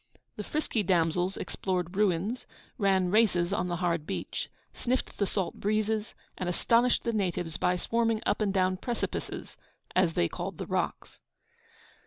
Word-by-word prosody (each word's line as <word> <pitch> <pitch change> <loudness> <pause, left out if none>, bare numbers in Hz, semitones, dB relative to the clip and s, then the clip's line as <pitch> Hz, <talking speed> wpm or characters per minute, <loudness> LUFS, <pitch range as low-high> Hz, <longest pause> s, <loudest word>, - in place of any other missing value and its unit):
The 210 - -4
frisky 295 -3 -1
damsels 180 0 +2
explored 180 -1 -2
ruins, 205 +4 +1 0.3
ran 190 -3 +3
races 190 -4 +3
on 180 - 0
the 175 - -1
hard 170 -3 0
beach, - - -3 0.2
sniffed 250 +1 -2
the 200 - +2
salt 190 -3 -2
breezes, 215 +1 0 0.2
and 180 - -1
astonished 235 +7 +3
the 235 - 0
natives 180 -5 -1
by 180 - +2
swarming 225 +3 +1
up - - +1
and 205 -2 +2
down 185 -1 +2
'precipices,' 240 +4 -4 0.4
as 180 -3 +3
they 85 - +3
called - - -5
the - - -4
rocks. - - -2
190 Hz, 150 wpm, -29 LUFS, 180-215 Hz, 0.4 s, ran